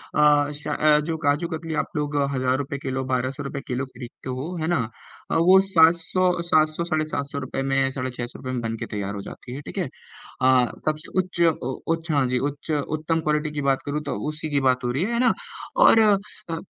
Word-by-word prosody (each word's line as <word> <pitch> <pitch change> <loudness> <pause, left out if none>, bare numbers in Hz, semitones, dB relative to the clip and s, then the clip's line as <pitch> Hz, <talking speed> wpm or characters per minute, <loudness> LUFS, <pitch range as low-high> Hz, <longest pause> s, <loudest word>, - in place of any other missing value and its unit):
अ, 150 -1 +4
श 150 +1 -8
अ, 150 0 +4
जो 165 0 -2
काजू 145 +4 +2
कतली 160 0 -5
आप - - -13
लोग 150 0 -2 0.2
₹1000 130 +2 -1
किलो, 130 -1 -2
1200 130 +3 -1
रुपये 140 0 -5
किलो 130 +1 -2
खरीदते 130 0 -10
हो, 135 +8 -4
है 160 - -1
ना? 175 - +2 0.5
अ, - - +1
वो 185 +3 +6
700, 170 +2 +4
700 155 +1 +3
साढ़े 155 -2 0
700 140 -1 -3
रुपये 135 0 -3
में, 135 0 +2
साढ़े 130 -1 -3
600 120 0 -6
रुपये 130 -1 -5
में 125 - -2
बनके 115 -1 -3
तैयार 100 0 -3
हो 100 - -5
जाती 125 +5 -9
है, 140 - -6
ठीक - - -9
है? - - -1 0.5
अ, 130 -1 +4
सबसे 155 +1 -2
उच्च 180 -1 -2 0.2
ओ 130 +1 -2 0.2
उच्च 165 0 -6
हाँ 140 -3 +3
जी, 125 0 +1
उच्च 145 +3 -3
उत्तम 155 +2 -1
क्वालिटी 150 0 0
की 150 - -3
बात 135 -1 +1
करूँ 150 +1 -2
तो 145 - -3
उसी 155 0 -4
की 145 -1 +2
बात 125 0 +1
हो 120 - 0
रही 135 +7 0
है, 225 +5 -1
है 235 - +1
ना? 245 -2 +4 0.4
और - - +7 0.5
अ, 165 0 -2
145 Hz, 215 wpm, -24 LUFS, 130-160 Hz, 0.5 s, और